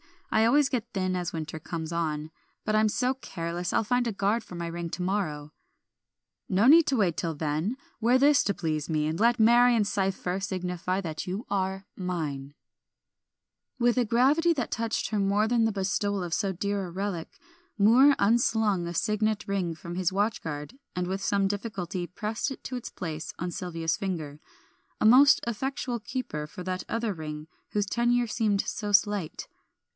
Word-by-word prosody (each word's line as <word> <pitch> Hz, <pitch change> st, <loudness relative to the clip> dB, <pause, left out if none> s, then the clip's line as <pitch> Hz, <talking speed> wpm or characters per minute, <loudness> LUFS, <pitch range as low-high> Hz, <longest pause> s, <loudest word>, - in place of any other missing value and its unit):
I 220 Hz, +1 st, +4 dB
always 280 Hz, +4 st, +4 dB
get 240 Hz, -4 st, -2 dB
thin 185 Hz, -1 st, 0 dB
as 180 Hz, -2 st, -2 dB
winter 160 Hz, -1 st, -5 dB
comes 160 Hz, 0 st, -5 dB
on, 155 Hz, -2 st, -2 dB, 0.3 s
but 215 Hz, -, 0 dB
I'm 215 Hz, 0 st, +4 dB
so 250 Hz, +4 st, +1 dB
careless 175 Hz, -8 st, -4 dB
I'll -, -, +2 dB
find 245 Hz, +2 st, +1 dB
a 230 Hz, -, -1 dB
guard 205 Hz, +4 st, 0 dB
for 180 Hz, -, -10 dB
my 170 Hz, 0 st, -4 dB
ring 170 Hz, 0 st, -4 dB
to -, -, -4 dB
morrow." 165 Hz, -6 st, -2 dB, 1.0 s
"No 195 Hz, +4 st, +3 dB
need 320 Hz, +3 st, +7 dB
to 270 Hz, -, +2 dB
wait 190 Hz, -8 st, +1 dB
till 165 Hz, -2 st, -2 dB
then; 155 Hz, -, -1 dB, 0.2 s
wear 240 Hz, +3 st, +4 dB
this 285 Hz, +2 st, +5 dB
to 200 Hz, -, +1 dB
please 155 Hz, -4 st, -2 dB
me, 155 Hz, -2 st, +1 dB
and 155 Hz, +2 st, -2 dB
let 235 Hz, +2 st, +3 dB
Marion's 235 Hz, -1 st, +5 dB
cipher 190 Hz, -2 st, -1 dB
signify 185 Hz, -1 st, -2 dB
that 160 Hz, -2 st, -5 dB
you 195 Hz, +6 st, -4 dB
are 190 Hz, 0 st, -1 dB
mine." 150 Hz, -7 st, -4 dB, 1.2 s
With 240 Hz, 0 st, +2 dB
a 245 Hz, -, +3 dB
gravity 275 Hz, +9 st, +3 dB
that 260 Hz, -7 st, -3 dB
touched 230 Hz, -1 st, -1 dB
her 215 Hz, -, 0 dB
more 200 Hz, +2 st, +2 dB
than 235 Hz, -2 st, +3 dB
the 225 Hz, -, +2 dB
bestowal 200 Hz, 0 st, -1 dB
of 170 Hz, -2 st, -4 dB
so 200 Hz, 0 st, 0 dB
dear 200 Hz, +2 st, -2 dB
a -, -, -9 dB
relic, 185 Hz, -2 st, -4 dB, 0.4 s
Moor 245 Hz, +7 st, +6 dB
unslung 215 Hz, -4 st, +2 dB
a 170 Hz, -, -4 dB
signet 215 Hz, +1 st, 0 dB
ring 185 Hz, -4 st, -1 dB
from 170 Hz, +2 st, -8 dB
his 185 Hz, -1 st, 0 dB
watchguard, 190 Hz, -, -2 dB, 0.2 s
and 180 Hz, 0 st, -1 dB
with 190 Hz, +1 st, -3 dB
some 200 Hz, 0 st, +1 dB
difficulty 195 Hz, -4 st, -4 dB
pressed 215 Hz, +8 st, -3 dB
it 270 Hz, -, -8 dB
to 255 Hz, -, -4 dB
its 245 Hz, -, -6 dB
place 160 Hz, -3 st, -6 dB
on 175 Hz, +1 st, -3 dB
Sylvia's 165 Hz, -2 st, -2 dB
finger, 160 Hz, -7 st, -4 dB, 0.6 s
a -, -, +1 dB
most 260 Hz, +6 st, +7 dB
effectual 240 Hz, +1 st, -2 dB
keeper 215 Hz, -, -4 dB
for 180 Hz, +3 st, -9 dB
that 185 Hz, 0 st, -3 dB
other 230 Hz, -2 st, -1 dB
ring 155 Hz, -2 st, -7 dB, 0.3 s
whose 205 Hz, -1 st, +1 dB
tenure 240 Hz, +3 st, +1 dB
seemed 215 Hz, -3 st, +1 dB
so 210 Hz, 0 st, -4 dB
slight. 200 Hz, -5 st, +1 dB
195 Hz, 180 wpm, -28 LUFS, 170-225 Hz, 1.2 s, need